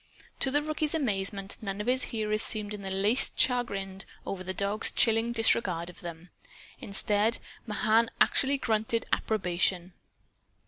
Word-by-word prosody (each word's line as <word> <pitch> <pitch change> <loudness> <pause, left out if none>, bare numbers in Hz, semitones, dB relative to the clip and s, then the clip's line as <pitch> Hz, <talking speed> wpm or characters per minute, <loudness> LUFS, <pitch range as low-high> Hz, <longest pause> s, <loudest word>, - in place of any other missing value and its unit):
To 270 - +4
the 290 +2 +1
rookie's 310 0 -1
amazement 200 -7 -2
none 200 -2 -4
of 210 - -3
his 255 +1 +2
hearers 215 -1 -1
seemed 210 -2 0
in 205 - -7
the 195 - -3
least 200 +6 +1
chagrined 195 -6 0 0.2
over 185 -2 -4
the 185 - -4
dogs 200 +3 0
chilling 225 +1 +2
disregard 195 -7 +1
of - - -19
them. 170 0 -9 0.5
Instead, 210 +2 +2 0.3
Mahan 220 +2 +2
actually 280 +1 +2
grunted 225 -2 -1
approbation. 180 -3 0
210 Hz, 140 wpm, -29 LUFS, 195-230 Hz, 0.5 s, To